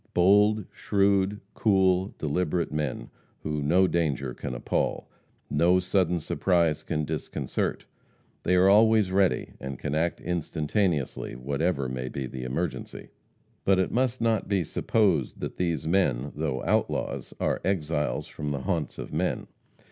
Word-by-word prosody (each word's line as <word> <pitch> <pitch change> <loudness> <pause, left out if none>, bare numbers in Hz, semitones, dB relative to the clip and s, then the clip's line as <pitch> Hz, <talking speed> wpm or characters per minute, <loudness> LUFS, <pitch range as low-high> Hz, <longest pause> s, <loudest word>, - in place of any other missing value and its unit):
Bold, 105 +3 +4
shrewd, 100 0 +1
cool, 95 -2 +2
deliberate 85 +2 -1
men, 75 -3 -3 0.3
whom 75 -2 -2
no 90 +4 +5
danger 70 -8 0
can 60 - -5
appall; - - -1 0.4
no 85 +5 +3
sudden 90 -1 +1
surprise 85 -1 +1
can 75 -2 -2
disconcert. 80 -1 -3 0.6
They 90 - +2
are 90 +1 +5
always 110 -1 +5
ready, 95 -1 +1
and 65 -1 -6
can 75 - -4
act 85 +3 0
instantaneously 85 - -1
whatever 70 +3 -1
may 65 0 -4
be 70 +1 -4
the 65 0 -6
emergency. 70 +8 -4 0.5
But 95 -1 +4
it 95 - +1
must 125 0 0
not 115 -2 +1
be 100 -3 +1
supposed 90 - +1
that - - -5
these 85 -3 -1
men, 75 -7 +1
though 75 -4 -2
outlaws, - - -1
are - - 0
exiles 80 -6 -1
from 75 - -5
the 70 -2 -2
haunts 80 0 -2
of - - -7
men. - - -1
85 Hz, 140 wpm, -27 LUFS, 75-95 Hz, 0.6 s, no